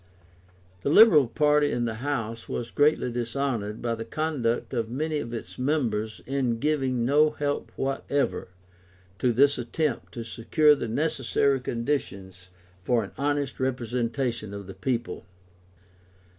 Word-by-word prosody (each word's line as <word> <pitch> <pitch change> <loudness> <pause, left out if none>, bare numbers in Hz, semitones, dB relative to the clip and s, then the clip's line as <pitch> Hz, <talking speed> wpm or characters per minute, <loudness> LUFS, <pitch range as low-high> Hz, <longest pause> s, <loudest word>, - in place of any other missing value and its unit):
The - - -1
Liberal 160 - +7
party 150 +2 +3
in 120 - -1
the 115 -1 -4
House 115 -5 -3
was 120 -1 -4
greatly 145 -4 +2
dishonoured 120 -3 -2
by 120 -1 0
the 115 0 -4
conduct 130 -3 -2
of 115 -3 -1
many 150 +5 -2
of 120 - -5
its 120 +1 -7
members 115 -6 -1
in 130 -3 0
giving 135 -3 0
no 150 +4 +4
help 145 -1 -3
whatever 135 +1 -1 0.7
to 125 - +2
this 140 +4 +3
attempt 135 +3 -2
to 120 - -4
secure 120 +7 +3
the 140 - -3
necessary 140 +1 +1
conditions 100 -8 -4 0.4
of 120 - +3
an 100 - -9
honest 145 -1 -1
representation 120 -3 -2
of 100 -1 -7
the 95 - -9
people. 120 +5 -3
125 Hz, 135 wpm, -26 LUFS, 115-145 Hz, 0.7 s, Liberal